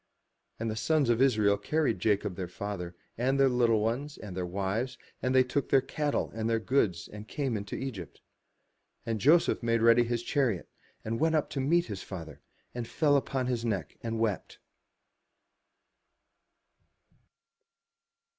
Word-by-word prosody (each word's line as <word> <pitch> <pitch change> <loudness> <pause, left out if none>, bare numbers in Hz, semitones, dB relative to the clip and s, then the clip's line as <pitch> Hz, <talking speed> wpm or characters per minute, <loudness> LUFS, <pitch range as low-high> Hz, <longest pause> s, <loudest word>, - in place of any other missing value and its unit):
And 115 0 -2
the - - -3
sons 145 +2 +2
of 120 +1 +1
Israel 105 -6 +4
carried 140 - 0
Jacob 100 -1 +1
their 90 0 -4
father, 90 -1 -5 0.2
and 135 +3 +1
their 135 - +6
little 120 -3 +3
ones, 130 +7 -2
and 100 -4 -8
their 90 -1 -2
wives, 100 +7 -2 0.2
and 130 +1 0
they 130 - +7
took 130 +2 -2
their 135 - +6
cattle 145 +2 -2
and 110 0 -2
their 115 0 +2
goods, 110 -8 0
and 105 +1 -10
came 135 -3 -2
into 100 -1 -4
Egypt. 115 -11 -6 0.9
And 115 -2 -2
Joseph 165 +5 +4
made 115 -1 +1
ready 115 +1 +6
his 120 0 -2
chariot, 120 - 0 0.4
and 115 +1 -2
went 160 0 +2
up 155 - 0
to 140 - -3
meet 170 +6 +2
his 100 -4 -6
father, 80 -6 -8 0.3
and 120 -2 -4
he - - -15
fell 145 -3 +3
on 130 -2 0
his 120 -2 -1
neck, 100 -10 -2
and 115 -1 -3
wept. 110 -4 -2
115 Hz, 160 wpm, -29 LUFS, 105-135 Hz, 0.9 s, they